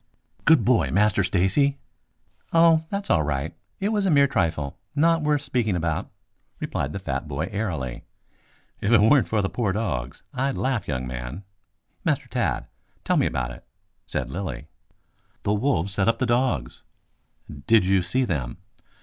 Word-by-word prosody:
"Good 150 -9 +5
boy, 125 -2 +3
Master 105 -1 +3
Stacy!" 95 +11 +2 0.7
"Oh, 165 -1 +5
that's 200 0 -3
all 80 - +4
right. 75 +2 -2 0.3
It 200 - 0
was 205 -3 +1
a - - +2
mere 140 -3 +6
trifle, 80 - -1 0.2
not 165 +2 +3
worth 150 -1 +1
speaking 115 -8 0
about," 85 +2 -2 0.5
replied 70 - -2
the - - -4
fat 70 -7 -4
boy 75 +5 -3
airily. 80 - -3 0.8
"If 100 - 0
it 115 - +7
weren't 115 +5 +4
for 105 -2 +1
the - - +1
poor 105 -2 -1
dogs, 70 - -3
I'd 135 +1 -1
laugh, 130 -7 -1
young 65 -3 -2
man. 60 +8 -6 0.6
Master - - 0
Tad, - - -1 0.4
tell - - +1
me - - +3
about 65 0 -2
it," - - -11 0.4
said 65 -1 -3
Lilly. 70 -8 -5 0.8
"The 100 - +1
wolves 105 - 0
set 100 0 +1
upon 115 - +3
the 130 - 0
dogs." 120 - 0 0.9
"Did 110 -4 +5
you 95 0 +3
see 130 +8 +1
them?" 70 - -3
100 Hz, 160 wpm, -24 LUFS, -, 0.9 s, it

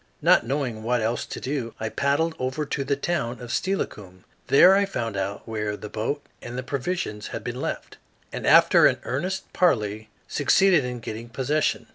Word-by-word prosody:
Not - - +5
knowing 130 -5 -2
what 120 +2 0
else 115 +2 -1
to - - -6
do, 130 -4 -4
I 110 - -2
paddled 145 +6 +1
over 130 +4 -2
to 140 - -2
the 140 +1 0
town 140 -5 -2
of 120 -1 -7
Steilacoom. 100 - -3 0.2
There 180 +7 +7
I 200 - +4
found 115 - -3
out 100 +3 -4
where 105 -2 -3
the 105 - -8
boat 115 +8 -3 0.2
and 120 +1 -7
the 130 - -3
provisions 130 -6 -3
had - - -6
been - - -5
left, - - -5 0.4
and - - -4
after - - +7
an - - +1
earnest 180 +10 -3
parley 110 - +1 0.2
succeeded 175 +2 +3
in 125 -1 -5
getting 115 +1 -7
possession. 145 +5 0
125 Hz, 180 wpm, -25 LUFS, 110-150 Hz, 0.4 s, There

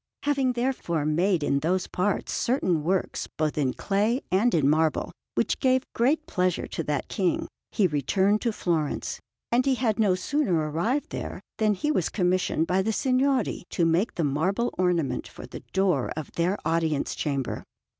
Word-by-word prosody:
Having 275 -3 +1
therefore 240 - -1
made 170 +2 +2
in 140 -1 +2
those 180 +5 0
parts 190 +2 -1
certain 185 - +1
works 185 +3 -1
both 155 -1 0
in 140 -4 +1
clay 210 +5 +1
and 200 +4 +3
in 150 -4 +3
marble, 155 +1 +2 0.2
which - - 0
gave 260 -1 +2
great 290 +7 +2
pleasure 180 -1 0
to - - -4
that 145 -2 -1
King, 185 -4 0 0.2
he 205 - +2
returned 190 +7 +2
to 235 - +1
Florence; 165 -7 -1 0.3
and 240 +2 +4
he 270 -1 +2
had 230 -4 0
no 200 -4 +4
sooner 260 - 0
arrived 225 - -1
there - - -5 0.2
than 215 -2 +3
he 300 +11 0
was 185 - +1
commissioned 180 -3 +1
by 185 +3 +2
the 220 +3 0
Signori 260 -1 +1
to 170 - +1
make 170 +7 +1
the 170 - 0
marble 180 - 0
ornament 175 -5 0
for - - -10
the - - -9
door 185 -9 +1
of 155 - -5
their 180 +4 0
Audience 160 -2 0
Chamber. 140 -4 -2
185 Hz, 170 wpm, -26 LUFS, 160-235 Hz, 0.3 s, and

